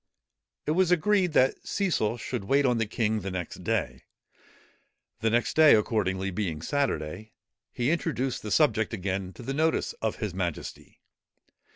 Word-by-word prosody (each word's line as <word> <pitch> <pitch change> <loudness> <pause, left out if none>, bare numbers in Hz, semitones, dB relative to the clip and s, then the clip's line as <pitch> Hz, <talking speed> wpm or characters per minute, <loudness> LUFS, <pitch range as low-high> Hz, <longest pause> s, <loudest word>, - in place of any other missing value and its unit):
It - - 0
was 180 +2 +3
agreed 180 0 +2
that 130 -2 +3
Cecil 155 - 0
should 100 - -4
wait 140 +6 +3
on 125 -2 +2
the 115 - 0
king 110 0 0
the 95 -1 -5
next 90 -2 -5
day. - - -2 1.1
The 115 - +1
next 120 +2 +1
day, 155 -1 +8
accordingly, 100 -3 0
being 90 -6 -3
Saturday, 105 - -2 0.4
he 125 +4 0
introduced 150 -6 -1
the 105 - -6
subject 110 -7 +2
again 95 -1 -3
to - - -11
the 135 +3 -3
notice 160 - +1
of - - -1
his - - -4
majesty. - - -5
115 Hz, 155 wpm, -27 LUFS, 100-150 Hz, 1.1 s, day